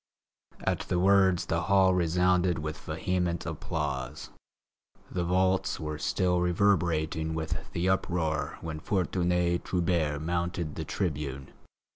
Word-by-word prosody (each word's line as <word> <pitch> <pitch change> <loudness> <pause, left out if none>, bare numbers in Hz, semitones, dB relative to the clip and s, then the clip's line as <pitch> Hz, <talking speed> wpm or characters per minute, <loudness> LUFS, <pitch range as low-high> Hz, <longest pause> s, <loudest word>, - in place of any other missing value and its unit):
At - - 0
the 90 - +1
words 95 -1 +4
the 80 0 0
hall 95 +1 +4
resounded 90 0 +2
with 75 0 -4
vehement 85 +2 -2
applause. 65 - -4 0.8
The 90 - -1
vaults 95 +2 +1
were 75 -1 -4
still 90 +1 +1
reverberating 85 -4 +1
with 80 0 -4
the 85 +2 0
uproar 80 -6 0
when 80 -2 -5
Fortuné 90 -1 0
Trubert 85 -5 0
mounted 85 -1 -2
the 80 - -5
tribune. 75 -7 -3
85 Hz, 115 wpm, -29 LUFS, 80-90 Hz, 0.8 s, words